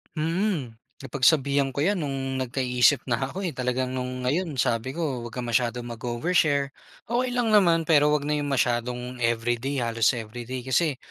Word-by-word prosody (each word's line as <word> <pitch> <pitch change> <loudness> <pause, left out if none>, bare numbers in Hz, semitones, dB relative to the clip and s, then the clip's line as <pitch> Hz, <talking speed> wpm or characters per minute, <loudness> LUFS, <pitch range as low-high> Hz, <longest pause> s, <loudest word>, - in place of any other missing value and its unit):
Mm. 160 - -1 0.2
Napagsabihan 140 0 +2
ko 135 - -12
yan 200 0 +1
nung 135 -2 -3
nagka-isip 125 +1 +2
na 120 -1 -1
ako, 195 +6 -5
eh, 170 - -2
talaga 125 0 -1
nung 125 0 -4
ngayon 155 +2 -1
sabi 125 +3 0
ko 145 -7 -2
wag 115 - -13
kang 125 - -3
masyadong 120 0 0
mag-overshare. 140 +5 0 0.3
Okey 245 +2 0
lang 230 -3 +1
naman 170 -5 +4
pero 150 -2 +4
wag 150 -1 +1
na 150 - 0
yung 145 -1 -1
masyadong 125 -1 -1
everyday, 120 +3 0
halos 115 -3 +2
everyday 120 +3 -6
kasi, 140 +1 +1
130 Hz, 160 wpm, -25 LUFS, 120-150 Hz, 0.3 s, naman